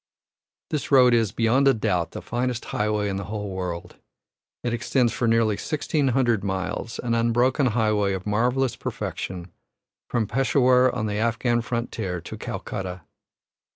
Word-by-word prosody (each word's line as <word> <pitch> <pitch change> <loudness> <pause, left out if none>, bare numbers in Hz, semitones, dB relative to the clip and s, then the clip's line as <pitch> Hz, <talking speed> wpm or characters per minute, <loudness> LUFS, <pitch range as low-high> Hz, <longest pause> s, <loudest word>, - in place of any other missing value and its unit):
This 150 - -2
road 125 -3 +6
is, 115 -4 +2
beyond 120 +4 +2
a 135 - +5
doubt, 95 -6 0
the - - -8
finest 125 0 -2
highway 105 -1 -1
in 95 -1 -2
the 100 - -4
whole 105 -1 -4
world. 90 -2 -5 0.7
It 120 - -1
extends 120 0 +1
for 120 - 0
nearly 115 -2 +3
sixteen 150 -1 -1
hundred 120 -5 +2
miles, 95 +3 -3
an 120 -1 -2
unbroken 120 +4 +2
highway 110 -3 +1
of 95 -1 -5
marvellous 120 +5 +1
perfection, 90 -1 -5 0.6
from 120 -3 +1
Peshawur 130 +1 +3
on 110 - -2
the 105 0 -2
Afghan 120 +1 +1
frontier 115 -6 -3
to 85 - -8
Calcutta. 95 -2 -5
115 Hz, 150 wpm, -24 LUFS, 105-125 Hz, 0.7 s, road